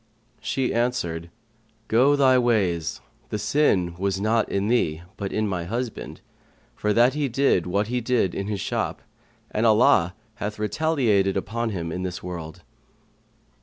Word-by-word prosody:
She 130 -2 -1
answered, 85 -9 -1 0.6
"Go 130 +6 +4
thy 130 -2 +5
ways, 95 -10 0 0.3
the - - -2
sin 100 - +2
was 95 0 0
not 110 +2 +1
in 100 +1 0
thee, 85 -9 +1
but 100 -1 -4
in 110 0 0
my 90 -4 -2
husband, 115 +4 -5 0.5
for 105 - -1
that 120 +4 +4
he 145 -2 -1
did 120 -8 +2
what 100 +4 +1
he 125 +3 -2
did 115 -6 +1
in 100 - -3
his 105 -2 -2
shop, - - -2 0.5
and 110 - -1
Allah 105 -5 +4 0.2
hath 105 +1 -4
retaliated 105 -4 +1
upon 115 +4 -2
him 85 -5 -4
in 90 - -3
this 90 -1 -5
world." 85 -3 -7
105 Hz, 150 wpm, -24 LUFS, 90-120 Hz, 0.6 s, thy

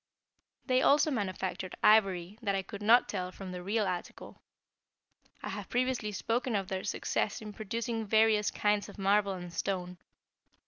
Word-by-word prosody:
They 255 -1 +2
also 295 +3 +4
manufactured 190 -5 -3
ivory 195 -2 +3
that 200 -3 0
I 195 - -1
could 200 +2 -9
not 230 +4 +5
tell 185 -2 -3
from 185 0 -8
the 180 0 -6
real 210 +4 0
article. 180 -2 -6 1.0
I - - -4
have - - -6
previously 245 -3 0
spoken 230 +4 -1
of 195 -2 -1
their 190 0 -3
success 205 - -1
in 210 -1 -8
producing 225 +1 -3
various 215 0 +4
kinds 210 -1 0
of - - -12
marble 200 0 +2
and 175 -2 -8
stone. 180 -1 -3
205 Hz, 155 wpm, -31 LUFS, 190-225 Hz, 1.0 s, not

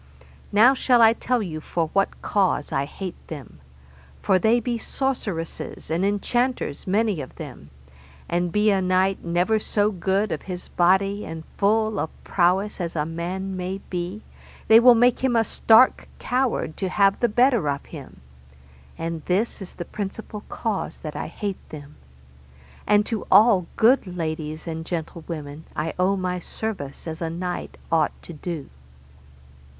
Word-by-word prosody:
Now 225 +6 +6
shall 255 -2 +3
I 225 -1 +7
tell 240 0 0
you 160 -5 -5
for 165 0 -2
what 195 0 0
cause 190 -7 +1
I 135 - 0
hate 185 +5 -8
them: 140 - -9 0.6
for 190 -2 +3
they 225 +6 +4
be 235 0 -2
sorceresses 215 - -3
and 170 +3 +1
enchanters 205 - -1
many 205 -3 +1
of 130 - -10
them, 70 - -9 0.6
and 175 0 0
be 210 +2 +3
a 195 -1 +2
knight 185 +1 +1
never 175 +6 +1
so 210 0 +1
good 195 +2 0
of 155 - -2
his 180 -2 -6
body 195 +3 +2
and 160 0 -7
full 215 +1 +2
of 160 - -1
prowess 190 +3 +1
as 170 -1 -4
man 170 +5 -3
may 185 +1 -3
be, 180 +4 -4 0.4
they 225 +1 +9
will 245 0 +8
make 245 +1 +4
him 260 -2 +2
a 225 - +4
stark 225 +3 +4
coward 250 -10 -1
to 190 - -2
have 195 +1 +3
the 240 - +2
better 240 - +3
of 140 0 -3
him, - - -11 0.8
and 165 -1 -4
this 200 +5 0
is 190 - -8
the 175 - -6
principal 210 +2 -6
cause 215 -4 -3
that 155 -2 -6
I - - -3
hate 195 +3 -5
them; 150 -1 -10 0.9
and 210 0 +4
to 225 -2 -3
all 205 -6 +6
good 235 -1 +4
ladies 155 -3 -4
and 160 -1 -4
gentlewomen 160 -2 -6
I 160 +1 -2
owe 190 +2 +3
my 180 -1 -2
service 175 -7 -5
as 160 +1 -5
a 165 - -1
knight 175 +2 -4
ought 165 -1 +1
to 170 - -9
do. 155 -1 -6
190 Hz, 155 wpm, -24 LUFS, 165-215 Hz, 0.9 s, they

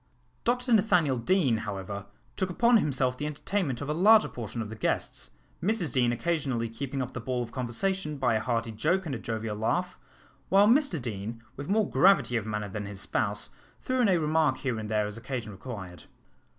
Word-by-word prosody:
Dr 245 +1 +1
Nathaniel 170 - +3
Deane, 135 -3 +2
however, 100 -2 -5 0.3
took 190 -2 -1
upon 235 +6 +4
himself 130 -7 0
the 150 - -2
entertainment 150 -2 -2
of 140 - -4
a 150 - 0
larger 210 +7 +6
portion 115 -1 -6
of 110 -2 -3
the 110 - -7
guests, 105 - -2 0.3
Mrs 190 -3 0
Deane 120 -2 +3
occasionally 130 -4 -1
keeping 135 +3 -3
up 125 - -7
the - - -4
ball 125 +1 -2
of 115 - -9
conversation 150 +6 -1
by 130 -3 +2
a 110 - +2
hearty 115 0 -1
joke 165 - 0
and 150 - -3
a 120 - -3
jovial 110 -2 -3
laugh, 175 +12 -1 0.5
while 200 +2 +6
Mr 245 - +3
Deane, 115 -1 -5
with 140 +1 -7
more 210 0 +3
gravity 175 -10 +4
of 110 -2 -1
manner 105 -1 -2
than 105 +1 -5
his 100 -1 -6
spouse, - - 0 0.3
threw 255 0 0
in 225 - +4
a 185 - +4
remark 155 -3 +2
here 125 -5 -2
and 105 -1 -5
there 105 -1 +1
as 105 +1 -5
occasion 120 -3 -5
required. 95 -4 -8
130 Hz, 195 wpm, -28 LUFS, 115-180 Hz, 0.5 s, larger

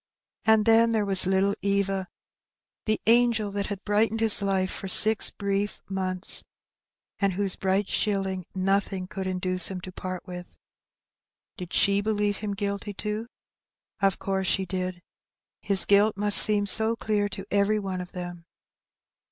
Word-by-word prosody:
And 220 -1 +3
then 230 0 +3
there 215 -2 0
was 190 -2 +3
little 190 +1 +1
Eva, 195 -1 -2 0.8
the 215 - 0
angel 230 -2 +2
that 200 0 -4
had 200 -1 -7
brightened 220 +2 0
his 220 -2 +4
life 190 -1 -1
for 195 - -6
six 215 +3 +6
brief 200 0 -4
months, 185 0 -1 0.8
and 195 -2 0
whose 195 0 -1
bright 195 +1 -1
shilling 195 -4 -3
nothing 195 0 -2
could 190 +1 -7
induce 185 0 +2
him 190 -2 -7
to 185 - -10
part 185 0 -8
with. 180 -1 -11 1.0
Did 180 -4 -10
she 200 0 +1
believe 205 -1 -2
him 205 -1 -5
guilty 200 0 -5
too? 210 +3 -5 0.7
Of 195 -1 +1
course 190 -1 -3
she 190 +1 0
did. 185 -1 -6 0.6
His 195 -2 +2
guilt 205 +1 +2
must 205 0 +6
seem 205 -1 +7
so 220 +2 +2
clear 210 -2 -2
to 195 0 -8
every 205 +1 +1
one 190 -3 -5
of 180 - -11
them. 175 -2 -9
200 Hz, 150 wpm, -25 LUFS, 190-210 Hz, 1.0 s, seem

